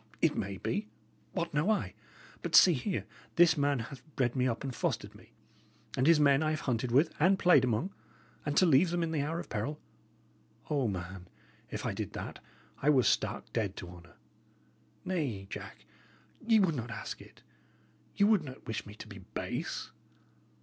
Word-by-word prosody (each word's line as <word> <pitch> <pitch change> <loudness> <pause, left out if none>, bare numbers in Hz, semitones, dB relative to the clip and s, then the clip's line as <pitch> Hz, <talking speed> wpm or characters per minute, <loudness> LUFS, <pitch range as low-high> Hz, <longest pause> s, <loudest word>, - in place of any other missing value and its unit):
It - - +3
may 95 0 -3
be; 205 - -2 0.5
what 170 -4 -2
know 150 +7 +2
I? 220 - 0 0.5
But, - - -1
see 180 - +9
here: 165 +7 -2 0.3
This 170 -1 +6
man 145 -1 +2
hath 125 +3 -7
bred 125 -1 +1
me 130 -1 +2
up 115 +1 -2
and 135 -2 -3
fostered - - -2
me, - - -18 0.6
and 130 - +2
his 165 -2 +6
men 140 -1 +5
I 155 - +1
have 155 0 -1
hunted 120 -1 -1
with 145 +7 +4
and 185 +5 +5
played 180 -8 +5
among; 125 - 0 0.5
and 145 0 -2
to 185 - +7
leave 165 +2 +5
them 175 0 0
in 165 - -2
the 155 -3 0
hour 160 +4 -2
of - - -6
peril 140 +9 -3 0.9
O, 140 -5 +2
man, 90 -1 -5 0.4
if - - -5
I - - -1
did - - -5
that, - - -6 0.4
I 145 - +3
were 135 -4 +5
stark - - 0
dead 100 -4 -1
to 90 - -7
honour! 85 -1 -14 0.9
Nay, 140 - -2
Jack, - - -8 0.6
ye 225 -2 +6
would 185 -5 +3
not 120 -4 -4
ask 115 - -6
it; - - -17 0.7
ye 200 - +4
would 210 -5 +4
not 130 -2 -10
wish 110 -1 -4
me 105 - -10
to - - -10
be - - -10 0.2
base." - - -3
140 Hz, 185 wpm, -31 LUFS, 115-170 Hz, 0.9 s, see